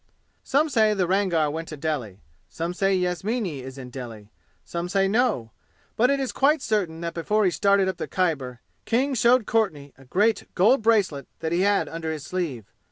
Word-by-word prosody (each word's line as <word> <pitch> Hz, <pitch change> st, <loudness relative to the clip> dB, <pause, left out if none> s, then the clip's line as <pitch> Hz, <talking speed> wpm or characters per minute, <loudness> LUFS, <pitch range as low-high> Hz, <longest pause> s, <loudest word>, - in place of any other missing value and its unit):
Some 290 Hz, +3 st, +2 dB
say 220 Hz, -6 st, +3 dB
the 190 Hz, -2 st, +1 dB
Rangar 175 Hz, -5 st, +1 dB
went 160 Hz, +2 st, -5 dB
to 155 Hz, -, -7 dB
Delhi. 140 Hz, -11 st, -3 dB, 0.3 s
Some 170 Hz, +2 st, -4 dB
say 195 Hz, +1 st, +1 dB
Yasmini 180 Hz, -, -2 dB
is 130 Hz, +1 st, -9 dB
in 125 Hz, -2 st, -9 dB
Delhi. 115 Hz, -5 st, -9 dB, 0.3 s
Some 170 Hz, +1 st, -4 dB
say 195 Hz, +1 st, +2 dB
no. 210 Hz, -, +1 dB, 0.4 s
But 245 Hz, +3 st, +3 dB
it 280 Hz, 0 st, +2 dB
is 265 Hz, -2 st, -2 dB
quite 290 Hz, +1 st, +2 dB
certain 185 Hz, -7 st, -1 dB
that 170 Hz, 0 st, -3 dB
before 210 Hz, +5 st, +1 dB
he 185 Hz, -, +3 dB
started 200 Hz, +1 st, +3 dB
up 190 Hz, -, -2 dB
the -, -, -4 dB
Khyber 140 Hz, -9 st, -1 dB, 0.2 s
King 265 Hz, +4 st, +1 dB
showed 245 Hz, 0 st, +4 dB
Courtenay 160 Hz, -13 st, -1 dB
a 135 Hz, -, -16 dB
great 210 Hz, -, +1 dB
gold 225 Hz, +8 st, +4 dB
bracelet 200 Hz, -, +1 dB
that 160 Hz, -1 st, -2 dB
he 175 Hz, +2 st, +1 dB
had 200 Hz, +1 st, +2 dB
under 165 Hz, -1 st, -4 dB
his 155 Hz, -2 st, -6 dB
sleeve. 155 Hz, -, -3 dB
180 Hz, 190 wpm, -25 LUFS, 155-215 Hz, 0.4 s, showed